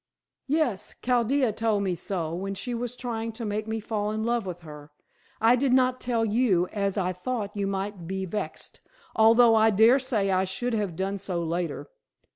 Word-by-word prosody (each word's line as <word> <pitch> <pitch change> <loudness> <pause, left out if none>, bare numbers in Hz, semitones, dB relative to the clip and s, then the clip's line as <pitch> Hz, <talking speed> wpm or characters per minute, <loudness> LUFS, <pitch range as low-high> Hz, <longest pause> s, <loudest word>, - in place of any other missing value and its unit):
"Yes! 275 -9 -1
Chaldea 250 0 +2
told 215 -2 0
me 190 -2 0
so, 170 -2 -3
when 195 +3 -4
she 245 +5 -4
was 240 +1 -3
trying 230 -2 -4
to 230 +1 -5
make 210 +1 -3
me 220 0 -2
fall 210 -1 -2
in 215 +1 -2
love 235 -3 0
with 175 -1 -6
her. 150 -2 -11 0.5
I 230 +2 +5
did 255 0 +1
not 255 0 +3
tell 235 -2 0
you, 210 -5 +2
as 200 -1 -2
I 185 -1 0
thought 205 +3 -4
that 205 - -6
you 200 - 0
might 195 -2 -4
be 190 +1 -3
vexed, 190 -4 -5 0.4
although 225 +1 +6
I 220 0 +5
dare 220 +6 +5
say 225 -7 0
I 185 0 +2
should 235 +6 -2
have 205 -6 -1
done 195 +3 -2
so 175 -2 -3
later. 165 -1 -3
210 Hz, 195 wpm, -26 LUFS, 190-235 Hz, 0.5 s, although